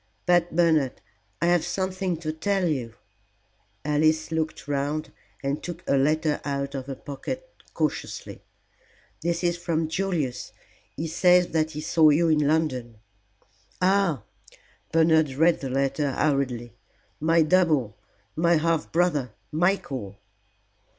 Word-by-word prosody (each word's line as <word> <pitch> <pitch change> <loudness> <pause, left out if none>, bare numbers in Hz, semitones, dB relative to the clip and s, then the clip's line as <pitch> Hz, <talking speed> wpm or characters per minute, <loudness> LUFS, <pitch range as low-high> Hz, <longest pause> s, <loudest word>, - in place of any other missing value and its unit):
But, 175 -1 +2
Bernard, 160 -7 +2 0.4
I - - +4
have 175 -1 +3
something 185 0 -2
to 155 -2 -3
tell 195 +3 0
you." 125 -7 -2 0.9
Alice 155 +2 +2
looked 160 -3 -3
round 145 +2 -2 0.3
and 140 +2 -1
took 175 0 -7
a - - +3
letter 150 +2 +1
out 140 -1 -3
of 135 -1 -5
her 135 - -4
pocket 145 - -6 0.3
cautiously. - - -3 0.8
"This 170 +1 -1
is 175 0 +1
from 165 -2 -1
Julius. 165 -7 -2 0.4
He 160 - -2
says 180 +2 +4
that 160 -1 +1
he - - -3
saw 155 0 +4
you 165 +3 +3
in 150 -2 +3
London." 130 -7 0 0.8
"Ah!" 185 -6 +2 0.7
Bernard 160 -3 +3
read 165 +4 +3
the 135 - -3
letter 135 +2 0
hurriedly. 130 -5 0 0.5
"My 165 +1 +4
double 155 - +2 0.4
my 170 +2 +3
half 165 0 0
brother, 150 -9 +1 0.2
Michael." 150 - -1
155 Hz, 125 wpm, -25 LUFS, 140-170 Hz, 0.9 s, I